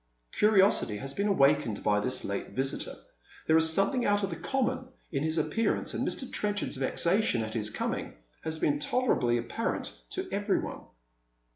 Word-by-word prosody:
Curiosity 195 - +4
has 135 +6 -5
been 200 +5 0
awakened 140 - +2
by 105 0 +3
this 125 +5 -1
late 100 0 -4
visitor. 135 +1 -1 0.5
There 160 - +4
is 160 0 +6
something 200 - +1
out 205 -1 +2
of 195 - -1
the - - -3
common 255 +7 -1 0.2
in 135 -4 -1
his 160 +2 0
appearance, 225 +8 0
and - - -1
Mr. - - -1
Tren 205 -3 -1
chard's 205 - -2
vexation 170 - +1
at 110 0 -5
his 105 -2 0
coming - - -3 0.3
has 160 0 -3
been 145 -2 +1
tolerably 150 - +1
apparent 120 - -3 0.2
to 375 0 -3
every 205 0 +1
one. - - -6
160 Hz, 170 wpm, -29 LUFS, 130-205 Hz, 0.5 s, is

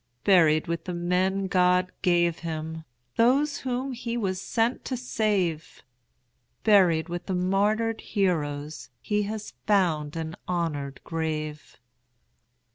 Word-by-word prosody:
Buried 160 -5 +5
with 170 -1 -3
the 180 - -4
men 185 +3 +1
God 180 -1 +3
gave 175 -2 +2
him, 160 -1 -5 0.3
Those 275 +5 +3
whom 260 +1 -2
he 235 -1 -4
was 190 -4 -1
sent 230 +4 0
to 255 - -2
save; 200 -9 -1 0.8
Buried 180 -7 +4
with 175 0 -5
the 190 - -1
martyred 205 +5 +1
heroes, 150 -8 -2
He 210 0 0
has 215 -1 -6
found 165 -8 +2
an 160 0 -4
honored 150 -6 -2
grave. 155 -2 -4
180 Hz, 120 wpm, -26 LUFS, 160-210 Hz, 0.8 s, Buried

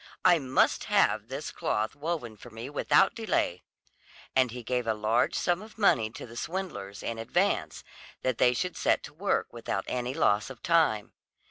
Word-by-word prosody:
I 175 -2 +6
must 130 -2 +2
have - - +2
this - - -5
cloth 110 +4 -1
woven 145 -7 -3
for 120 - -13
me 115 +4 -8
without - - +3
delay." 215 - -1 0.7
And 130 -1 +4
he 125 +1 -7
gave 125 0 -1
a 110 - +1
large 110 +3 +1
sum 175 +1 +1
of 215 +1 -13
money 120 - +3
to - - -9
the 115 - -12
swindlers, 120 - -5
in 115 -1 -3
advance, 115 - 0 0.4
that 130 -3 0
they 125 - +5
should 180 +7 -2
set - - +1
to 145 - -10
work 195 +6 -1
without 115 -4 -3
any 125 +1 -2
loss 105 +5 +2
of 135 - -11
time. 160 -12 +2
125 Hz, 175 wpm, -29 LUFS, 110-170 Hz, 0.7 s, I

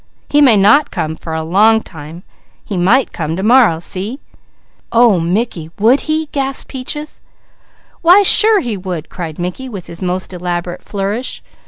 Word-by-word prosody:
He 295 - +3
may 250 -7 +5
not 220 +10 +4
come 160 0 -4
for 160 0 -7
a 160 - -3
long 210 +7 +3
time; 160 +2 -11 0.4
he 205 - -5
might 205 +9 +2
come 160 -1 -3
to 190 - -4
morrow. 230 -6 +4
See?" 195 - -4 0.7
"Oh 230 -5 +4
Mickey! 170 -1 -2
Would 235 +7 +3
he?" 315 +1 0
gasped 270 -1 -3
Peaches. 295 +3 -7 0.8
"Why 360 +5 +6
sure 420 +1 +6
he 235 -4 -3
would!" 180 -4 -6
cried 165 -4 -7
Mickey 180 +9 -5
with 195 -7 -8
his 170 - -10
most 185 +1 -3
elaborate 175 0 -4
flourish. 205 +5 -4
200 Hz, 160 wpm, -15 LUFS, 175-260 Hz, 0.8 s, Why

